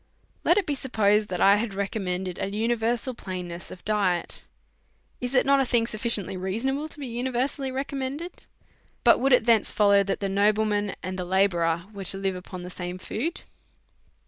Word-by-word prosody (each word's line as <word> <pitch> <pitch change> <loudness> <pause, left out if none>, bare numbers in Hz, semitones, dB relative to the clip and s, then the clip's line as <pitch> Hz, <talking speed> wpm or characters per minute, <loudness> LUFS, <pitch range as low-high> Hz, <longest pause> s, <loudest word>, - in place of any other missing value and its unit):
Let 345 - +4
it 405 - +2
be 295 - -1
supposed 215 -6 +1
that 180 - -3
I 200 +1 +6
had 210 -2 -3
recommended 190 -2 -3
an 195 - -3
uni 230 +3 +1
versal 235 +2 -1
plainness 180 -4 -6
of 180 - -11
diet; 195 -5 0 0.7
is 250 +2 -3
it 250 - +4
not 275 0 +4
a - - +4
thing 240 -2 +2
sufficiently 215 -4 +2
reasonable 250 +11 -2
to - - -12
be 280 - -4
universally 255 +3 -2
recommended? 275 +5 -5 0.6
But - - +6
would 270 +2 +2
it 250 -3 +5
thence 230 -3 +4
follow 200 -1 +4
that 195 0 -2
the 200 - -1
nobleman 205 +1 +1
and 185 0 -4
the - - -2
la 190 +2 +3
bourer 170 -2 0
were 195 -1 -7
to 195 - +2
live 195 -1 -1
upon 180 0 -8
the 180 - -7
same 180 0 -5
food? 265 - -4
210 Hz, 185 wpm, -26 LUFS, 190-250 Hz, 0.7 s, I